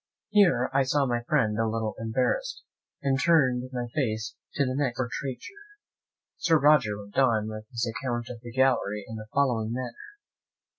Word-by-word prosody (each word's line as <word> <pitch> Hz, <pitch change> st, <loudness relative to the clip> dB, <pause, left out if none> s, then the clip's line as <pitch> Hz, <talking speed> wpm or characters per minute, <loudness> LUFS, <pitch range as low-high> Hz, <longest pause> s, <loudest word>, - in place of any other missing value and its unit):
Here 200 Hz, -5 st, +4 dB
I 135 Hz, -, +4 dB
saw 140 Hz, +2 st, +2 dB
my 120 Hz, -2 st, 0 dB
friend 115 Hz, -5 st, +1 dB
a 115 Hz, -, +2 dB
little 110 Hz, -1 st, -2 dB
embarrassed, 130 Hz, -, -1 dB, 0.4 s
and 135 Hz, -1 st, +1 dB
turned 130 Hz, -6 st, +3 dB
my 125 Hz, -1 st, -3 dB
face 110 Hz, -4 st, -1 dB, 0.2 s
to 140 Hz, -, +2 dB
the 130 Hz, -, -1 dB
next 130 Hz, -3 st, -1 dB
portraiture. 130 Hz, -, -4 dB, 0.8 s
Sir 165 Hz, -2 st, +3 dB
Roger 145 Hz, -9 st, +4 dB
went 100 Hz, +4 st, -4 dB
on 115 Hz, -5 st, +3 dB
with 110 Hz, 0 st, -7 dB
his 120 Hz, -2 st, -2 dB
account 120 Hz, 0 st, -3 dB
of 120 Hz, -2 st, -9 dB
the 120 Hz, -1 st, -9 dB
gallery 115 Hz, -5 st, +1 dB
in 110 Hz, -, -6 dB
the 110 Hz, 0 st, -8 dB
following 120 Hz, -6 st, +1 dB
manner. 125 Hz, -1 st, -4 dB
125 Hz, 165 wpm, -27 LUFS, 110-135 Hz, 0.8 s, Here